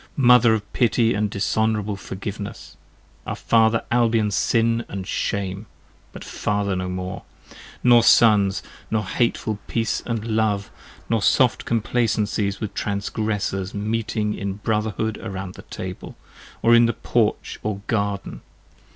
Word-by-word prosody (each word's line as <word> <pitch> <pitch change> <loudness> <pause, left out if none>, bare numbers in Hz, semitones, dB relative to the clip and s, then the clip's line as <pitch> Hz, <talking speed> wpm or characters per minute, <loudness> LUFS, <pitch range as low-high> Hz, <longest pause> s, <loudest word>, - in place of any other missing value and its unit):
Mother 125 -3 +6
of 105 -2 -7
pity 115 -1 +2
and 105 +1 0
dishonourable 105 +1 0
forgiveness! 100 +1 -7 0.5
Our - - -2
Father 115 0 +2
Albion's 115 -3 +2
sin 115 +3 +2
and 95 -1 -5
shame! 100 +2 -3 0.4
But - - -9
father 100 -1 -1
now 90 0 -2
no - - -4
more! 90 +1 -5 0.6
Nor 120 -1 +7
sons, 105 -4 +5 0.3
nor 110 -1 0
hateful 110 0 -1
peace 115 -2 -1
& - - -10
love, 110 -3 -1 0.4
nor 115 -2 +1
soft 125 +3 +3
complacencies 110 -2 0
15 - - -19
With 105 - -8
transgressors 100 -1 -2
meeting 105 0 -1
in 100 -2 -3
brotherhood 110 +1 -2
around 95 -1 -6
the - - -11
table, - - -8 0.5
Or 115 - +5
in 115 0 +6
the 115 - 0
porch - - -1
or 105 -2 -3
garden. 100 -3 -2
105 Hz, 135 wpm, -22 LUFS, 100-115 Hz, 0.6 s, Nor